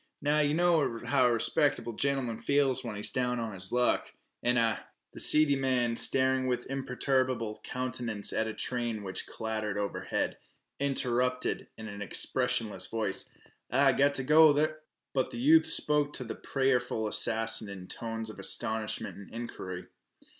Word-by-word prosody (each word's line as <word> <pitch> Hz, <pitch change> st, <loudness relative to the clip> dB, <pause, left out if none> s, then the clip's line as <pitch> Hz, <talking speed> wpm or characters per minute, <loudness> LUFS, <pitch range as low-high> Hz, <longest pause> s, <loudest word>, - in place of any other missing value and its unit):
Now, 150 Hz, +1 st, +1 dB
yeh 145 Hz, -1 st, +2 dB
know 165 Hz, -8 st, +2 dB
how 130 Hz, -3 st, +3 dB
a -, -, +2 dB
respecter'ble 120 Hz, 0 st, 0 dB
gentlem'n 130 Hz, -4 st, -1 dB
feels 140 Hz, 0 st, +1 dB
when 115 Hz, -3 st, -5 dB
he's 105 Hz, -, -3 dB
down 125 Hz, -1 st, -1 dB
on 115 Hz, -2 st, -4 dB
his 95 Hz, 0 st, -4 dB
luck, 125 Hz, 0 st, +1 dB, 0.3 s
an' 120 Hz, +1 st, +1 dB
I 115 Hz, -2 st, +2 dB, 0.2 s
" -, -, -53 dB
The -, -, -9 dB
seedy 150 Hz, -2 st, +5 dB
man, 130 Hz, -3 st, 0 dB
staring 130 Hz, +1 st, +4 dB
with 125 Hz, -1 st, -1 dB
imperturbable 130 Hz, -4 st, -1 dB
countenance 120 Hz, -4 st, -3 dB
at 110 Hz, -, 0 dB
a 110 Hz, -, -4 dB
train 120 Hz, -4 st, -2 dB
which 95 Hz, -1 st, -4 dB
clattered 110 Hz, -2 st, -3 dB
overhead, 100 Hz, -1 st, -2 dB, 0.4 s
interrupted 125 Hz, -2 st, 0 dB
in 110 Hz, -, -8 dB
an 100 Hz, -1 st, -8 dB
expressionless 125 Hz, +1 st, 0 dB
voice 105 Hz, -4 st, -2 dB, 0.4 s
"Ah, 135 Hz, +2 st, +4 dB
go 140 Hz, +2 st, +3 dB
t' 135 Hz, -2 st, 0 dB, 0.4 s
h 155 Hz, -, +1 dB, 0.2 s
!" -, -, -58 dB
But 130 Hz, -2 st, 0 dB
the -, -, -8 dB
youth 315 Hz, +6 st, +5 dB
spoke 150 Hz, -1 st, +2 dB
to 130 Hz, -, 0 dB
the 115 Hz, -, -5 dB
prayerful 130 Hz, -5 st, 0 dB
assassin 110 Hz, 0 st, +1 dB
in 95 Hz, -2 st, -8 dB
tones 115 Hz, +2 st, -4 dB
of 105 Hz, -, -13 dB
astonishment 110 Hz, +2 st, -2 dB
and 100 Hz, -, -12 dB
inquiry. 95 Hz, -6 st, -6 dB
125 Hz, 160 wpm, -30 LUFS, 110-135 Hz, 0.4 s, seedy